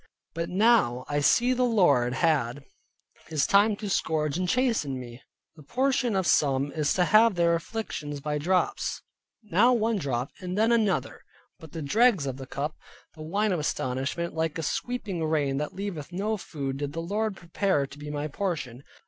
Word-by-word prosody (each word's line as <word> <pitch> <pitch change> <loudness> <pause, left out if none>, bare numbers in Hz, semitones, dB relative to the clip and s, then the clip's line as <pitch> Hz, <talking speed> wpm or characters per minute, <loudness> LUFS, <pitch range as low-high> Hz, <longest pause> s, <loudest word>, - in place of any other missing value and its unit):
But 165 +1 -3
now 190 - +3
I 145 0 0
see 240 - +3
the 255 - -1
Lord 175 - +3
had 140 -3 +1 0.6
His 155 -3 +1
time 205 +2 +4
to 205 +1 -6
scourge 155 -6 0
and 180 +1 -1
chasten 225 - +1
me. 120 0 -10 0.3
The 155 - -14
portion 250 - 0
of 190 -1 +1
some 140 -2 +2
is 150 -2 0
to 180 - +3
have 215 +1 +5
their 170 -1 +3
afflictions 165 -5 -4
by 150 +1 -2
drops, 180 +5 0 0.4
now 215 +5 +4
one 225 -2 +1
drop 130 -4 -2
and 180 +1 -5
then 220 +2 +3
another; 215 -5 +1 0.4
but 160 -2 -12
the 165 -2 -5
dregs 210 - +3
of 135 -1 -4
the 135 -1 -8
cup, 145 +4 -4 0.4
the 155 - -12
wine 200 +7 0
of 180 - 0
astonishment, 140 +4 -2
like 160 0 -1
a 165 - -3
sweeping 200 - -3
rain 150 -4 0
that 150 +1 -4
leaveth 185 -6 -5
no 205 +5 -1
food, 140 -8 -5
did 145 0 -4
the 165 - -4
Lord 205 +4 -2
prepare 175 -3 0
to 140 +2 -13
be 150 0 -7
my 150 0 -3
portion. 145 - -4
165 Hz, 180 wpm, -27 LUFS, 145-205 Hz, 0.6 s, have